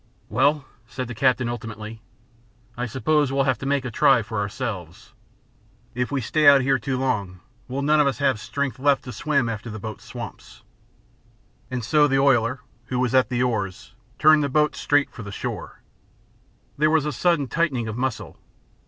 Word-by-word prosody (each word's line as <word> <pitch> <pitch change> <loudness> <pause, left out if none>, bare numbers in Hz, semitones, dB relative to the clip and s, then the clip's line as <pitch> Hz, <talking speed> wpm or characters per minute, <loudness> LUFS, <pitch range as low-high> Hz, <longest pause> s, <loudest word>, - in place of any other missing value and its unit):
"Well," 145 0 +2 0.2
said 130 +1 -5
the 125 - -6
captain, 130 +1 +2
ultimately, 110 -2 -6 0.7
"I 125 +1 -3
suppose 145 +3 +1
we'll 135 0 +2
have 130 -5 0
to 135 - -5
make 140 -2 0
a 125 - -4
try 115 0 +4
for 110 0 -4
ourselves. 105 -1 -5 0.8
If 125 +1 -2
we 140 -2 0
stay 150 +6 +2
out 140 -1 +8
here 135 0 +2
too 130 +3 -2
long, 105 -9 -2 0.3
we'll 135 +2 -3
none 150 +1 +3
of 145 - +4
us 135 - -1
have 135 -5 +1
strength 130 +5 -3
left 140 0 +2
to 125 - -7
swim 140 +3 0
after 115 0 -5
the 110 - -6
boat 110 -1 -7
swamps." 120 -2 -10 1.1
And 125 -3 -4
so 150 +3 +4
the 135 -1 +1
oiler, 130 -2 +2 0.2
who 125 - -3
was 125 -1 0
at 130 -1 +4
the 125 -1 0
oars, 100 -6 -3 0.2
turned 155 0 +6
the 140 - -1
boat 150 +2 +2
straight 145 -1 +1
for - - -10
the 105 -1 -7
shore. - - -6 1.0
There 155 +1 +4
was 155 -2 +2
a 150 - -1
sudden 170 -6 +1
tightening 135 -4 0
of 110 - -4
muscle. 130 0 -4
130 Hz, 185 wpm, -23 LUFS, 115-140 Hz, 1.1 s, out